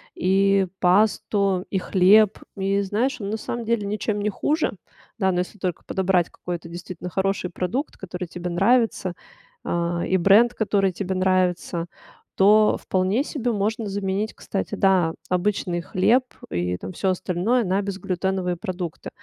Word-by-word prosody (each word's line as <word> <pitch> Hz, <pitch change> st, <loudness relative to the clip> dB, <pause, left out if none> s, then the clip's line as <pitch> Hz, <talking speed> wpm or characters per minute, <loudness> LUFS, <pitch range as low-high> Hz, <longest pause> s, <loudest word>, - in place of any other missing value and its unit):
и 195 Hz, +1 st, +3 dB
пасту, 195 Hz, 0 st, +2 dB
и 190 Hz, -, +1 dB
хлеб. 195 Hz, +3 st, +4 dB, 0.2 s
И 195 Hz, +1 st, +1 dB
знаешь, 245 Hz, +9 st, -1 dB
ну, 205 Hz, -, -5 dB
на 220 Hz, -, -1 dB
самом 235 Hz, +1 st, -5 dB
деле 220 Hz, -3 st, 0 dB
ничем 210 Hz, 0 st, -2 dB
не 210 Hz, -, 0 dB
хуже. 300 Hz, -, 0 dB, 0.4 s
Да, 190 Hz, -3 st, +2 dB
но 180 Hz, -, 0 dB
если 180 Hz, +4 st, -4 dB
только 180 Hz, -4 st, -3 dB
подобрать 185 Hz, -2 st, +1 dB
какой-то 175 Hz, -1 st, -6 dB
действительно 175 Hz, +1 st, -7 dB
хороший 190 Hz, 0 st, -1 dB
продукт, 185 Hz, -, -3 dB
который 180 Hz, -1 st, -6 dB
тебе 175 Hz, +1 st, -5 dB
нравится, 225 Hz, -2 st, +2 dB, 0.5 s
а, 170 Hz, 0 st, -1 dB
и 190 Hz, -, +2 dB
бренд, 210 Hz, +7 st, +5 dB
который 200 Hz, -3 st, +1 dB
тебе 190 Hz, +1 st, -3 dB
нравится, 185 Hz, -2 st, 0 dB, 0.5 s
то 210 Hz, +2 st, +5 dB
вполне 190 Hz, +8 st, +1 dB
себе 245 Hz, -6 st, -2 dB
можно 215 Hz, +2 st, -1 dB
заменить, 200 Hz, +2 st, -2 dB
кстати, 195 Hz, -, -4 dB
да, 185 Hz, -4 st, +3 dB, 0.2 s
обычный 180 Hz, -2 st, 0 dB
хлеб 205 Hz, +8 st, +2 dB, 0.3 s
и 90 Hz, 0 st, -1 dB
там 185 Hz, -, -7 dB
всё 190 Hz, +2 st, -1 dB
остальное 185 Hz, +6 st, 0 dB
на 190 Hz, +2 st, +1 dB
безглютеновые 190 Hz, -2 st, -2 dB
продукты. 180 Hz, -2 st, -5 dB
190 Hz, 145 wpm, -23 LUFS, 180-210 Hz, 0.5 s, бренд